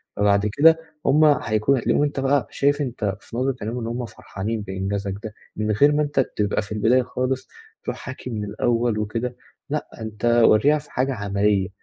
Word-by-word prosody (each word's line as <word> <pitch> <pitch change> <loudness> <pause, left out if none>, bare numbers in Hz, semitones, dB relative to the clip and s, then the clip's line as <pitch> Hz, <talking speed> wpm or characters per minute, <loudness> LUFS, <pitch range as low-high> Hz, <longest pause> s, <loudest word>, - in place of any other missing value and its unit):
فبعد 100 0 +3
كده 160 +7 +5 0.3
هُم 150 +3 +5
هيكون 130 -3 +2
هتلاقيهم 130 - +1
أنت 145 -1 -1
بقى 135 0 +1
شايف 145 +1 +1
أنت 110 -7 -2
في 120 - -9
نظرة 130 +1 0
عينيهم 115 +4 -3
إن 115 - -4
هُم 120 +1 -3
فرحانين 110 0 -5
بإنجازك 100 0 -3
ده 110 - -6 0.2
من 110 0 -1
غير 140 +8 +5
ما 150 +1 +2
أنت 145 -1 -1 0.2
تبقى 105 -1 +1
في 100 - -11
البداية 110 +4 +3
خالص 130 +1 -2 0.4
ترُوح - - -4
حاكي 130 -1 -8
من 105 -3 -3
الأول 115 +2 0
وكده، 115 +4 -3 0.3
لأ 150 +1 -2
أنت 110 0 -5 0.2
ورّيها 140 +8 +5
في 145 - -16
حاجة 135 +1 0
عملية، 100 -2 0
115 Hz, 185 wpm, -23 LUFS, 105-135 Hz, 0.4 s, كده